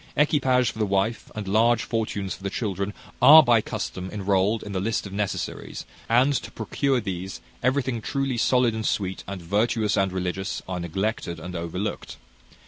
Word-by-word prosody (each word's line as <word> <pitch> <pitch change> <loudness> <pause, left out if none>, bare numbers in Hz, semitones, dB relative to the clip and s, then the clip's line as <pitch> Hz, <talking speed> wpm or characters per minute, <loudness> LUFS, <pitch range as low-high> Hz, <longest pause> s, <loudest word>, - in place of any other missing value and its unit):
Equipage 130 -5 +3
for 110 - -11
the 110 - +2
wife, 100 +4 0
and 105 -2 -5
large 115 +4 +3
fortunes 105 -5 -2
for - - -11
the 100 - -2
children, 100 -2 -2 0.3
are 155 +2 +10
by 120 -4 +4
custom 95 -3 -5
enrolled 100 +1 +1
in 105 - -7
the 95 - -1
list 110 +4 -1
of 100 - -8
necessaries; 100 -1 -3 0.2
and 125 +5 +4
to 130 - -2
procure 130 +4 0
these, 95 -3 -5 0.2
everything 130 -2 0
truly 135 +1 -1
solid 125 0 +3
and 110 -1 -2
sweet, 95 -2 -2
and 100 -3 -6
virtuous 105 +3 +1
and 95 -1 +1
religious, 95 +1 -3
are 90 -1 -3
neglected 85 +1 -2
and 90 0 -7
overlooked. 90 +5 -4
105 Hz, 170 wpm, -25 LUFS, 95-120 Hz, 0.3 s, are